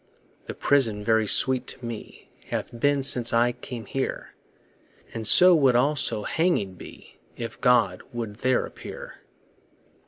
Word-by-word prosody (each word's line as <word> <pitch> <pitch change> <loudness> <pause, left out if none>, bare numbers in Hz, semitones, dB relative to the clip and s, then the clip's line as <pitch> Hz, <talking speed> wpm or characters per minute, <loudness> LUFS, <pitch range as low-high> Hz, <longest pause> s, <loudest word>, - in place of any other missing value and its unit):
The - - -6
prison 115 -7 0
very 110 0 +1
sweet 130 +3 +3
to 125 - -4
me 115 -2 -9 0.2
Hath 120 - -5
been 145 +1 +1
since 120 -3 +3
I 120 +1 +3
came 120 -2 -9
here, 135 -1 -5 0.8
And 110 -2 -5
so 180 +8 +8
would 135 -6 +3
also 130 -4 0
hanging 160 - -1
be, 90 - -14 0.2
If 115 -1 -7
God 115 -7 +2
would 115 -4 -6
there 130 +1 0
appear. - - -11
120 Hz, 135 wpm, -24 LUFS, 110-135 Hz, 0.8 s, so